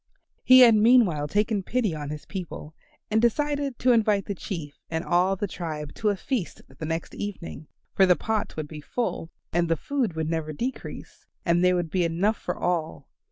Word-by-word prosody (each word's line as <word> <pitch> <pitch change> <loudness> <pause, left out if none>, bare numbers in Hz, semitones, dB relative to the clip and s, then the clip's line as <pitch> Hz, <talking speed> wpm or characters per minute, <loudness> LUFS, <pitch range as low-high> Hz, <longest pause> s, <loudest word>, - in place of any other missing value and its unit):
He 255 0 +8
had 235 -2 +9
meanwhile 215 -9 +4
taken 210 +4 +1
pity 220 -1 -1
on 150 -2 -5
his 150 0 -7
people 175 -5 -7 0.4
and 220 +1 +3
he 235 - +6
decided 285 -1 -2
to 255 - +3
invite 215 -4 +3
the 200 - -3
Chief 165 -6 -7
and 160 0 -2
all 180 +2 +2
the 200 - -2
tribe 155 -6 -5
to 215 - 0
a 205 - +1
feast 205 0 -3
the 135 +4 -8
next 165 +1 -3
evening, 190 -6 -6 0.3
for 190 - +5
the 180 - +6
pots 215 +6 -2
would 155 -1 -4
be 150 0 -9
full, 165 0 -3 0.2
and 170 0 +1
the 165 - +3
food 255 - -2
would 160 -1 -2
never 160 -1 -2
decrease, 250 - -6 0.2
and 170 0 +3
there 180 0 +4
would 175 -3 -2
be 180 +1 +1
enough 175 +6 +1
for 180 - -4
all. 165 - -2
180 Hz, 200 wpm, -26 LUFS, 160-220 Hz, 0.4 s, had